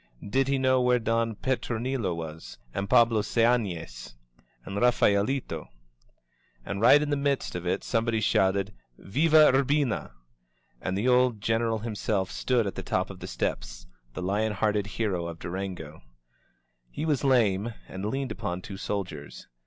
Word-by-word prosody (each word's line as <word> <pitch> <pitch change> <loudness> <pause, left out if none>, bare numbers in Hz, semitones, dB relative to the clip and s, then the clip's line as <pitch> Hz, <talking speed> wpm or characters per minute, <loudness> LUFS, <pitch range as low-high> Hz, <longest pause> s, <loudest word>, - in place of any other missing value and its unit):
Did 135 +6 +1
he 140 0 +1
know 130 -1 +3
where 125 0 +3
Don 115 -1 0
Petronilo 120 -5 -2
was? 80 -1 -8 0.2
And 100 0 -3
Pablo 115 -3 +5
Seanes? 95 - -1 0.5
And 95 - -6
Raphaelito? 120 +2 +1 1.0
And 100 0 -4
right 130 +5 +7
in 150 0 -2
the - - +3
midst 140 -1 -1
of 90 0 -5
it 90 - -1
somebody 115 -1 0
shouted 100 -1 +1 0.2
Viya 155 +7 +4
Ur 135 +1 +4
bina!" 140 - 0 0.7
and 95 +1 -2
the 110 +5 0
old 125 -3 +3
Greneral 115 0 0
himself 105 -3 -2
stood 125 -3 +1
at 100 - -3
the - - -6
top - - -1
of - - -11
the - - -7
steps, - - -4
— - - -37
the 90 - -4
lion 105 +3 0
hearted 105 0 0
hero 100 -5 -2
of 85 -1 -7
Durango. 85 -4 -6 0.9
He 105 - -4
was 150 -4 0
lame, 115 -5 +2 0.2
and 95 +1 -7
leaned 135 +5 -2
upon 90 +1 -4
two 100 - -7
soldiers. 90 -8 -5
110 Hz, 155 wpm, -27 LUFS, 95-125 Hz, 1.0 s, right